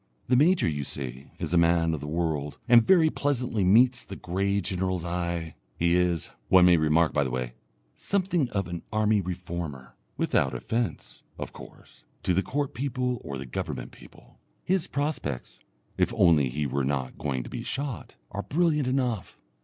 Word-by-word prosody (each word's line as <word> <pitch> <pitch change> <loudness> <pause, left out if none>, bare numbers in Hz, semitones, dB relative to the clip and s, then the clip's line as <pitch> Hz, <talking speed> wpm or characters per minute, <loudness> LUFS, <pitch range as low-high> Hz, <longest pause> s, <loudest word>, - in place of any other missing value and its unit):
The 125 - +5
major 165 - +4
you 75 -3 -1
see 65 -1 -6
is 80 +1 -3
a 85 - +5
man 85 -1 +3
of 80 - -2
the 75 - -7
world, 75 -3 -2
and 120 -1 +8
very 165 -2 +5
pleasantly 125 -7 0
meets 120 +6 +5
the 95 - -8
grey 100 +3 -1
general's 95 -2 -2
eye. 85 -2 -2 0.2
He 85 0 +2
is, 90 -2 +1 0.2
one 95 -1 +7
may 90 -1 +6
remark 80 +1 +3
by 70 - +2
the 65 - -2
way, 60 -1 -3 0.4
something 180 -8 0
of 100 -5 -2
an 85 -1 -5
army 110 -1 +2
reformer, 85 -8 -6 0.2
without 65 -2 +1
offence, 115 - -3 0.2
of - - -6
course, - - -14 0.2
to 90 - +2
the 95 - +3
Court 140 +5 -2
people 125 -2 -2
or 70 -3 -5
the 65 - -6
Government 65 - -5
people. - - -17 0.2
His 185 -2 +1
prospects 140 - -3 0.4
if - - +3
only 75 -6 +4
he 75 +4 -2
were 70 0 -1
not 65 -1 -2
going 65 -4 -2
to - - -9
be - - -4
shot 135 -3 -4 0.2
are 100 - -3
brilliant 150 0 +1
enough. 125 -6 -1
90 Hz, 175 wpm, -27 LUFS, 75-125 Hz, 0.4 s, and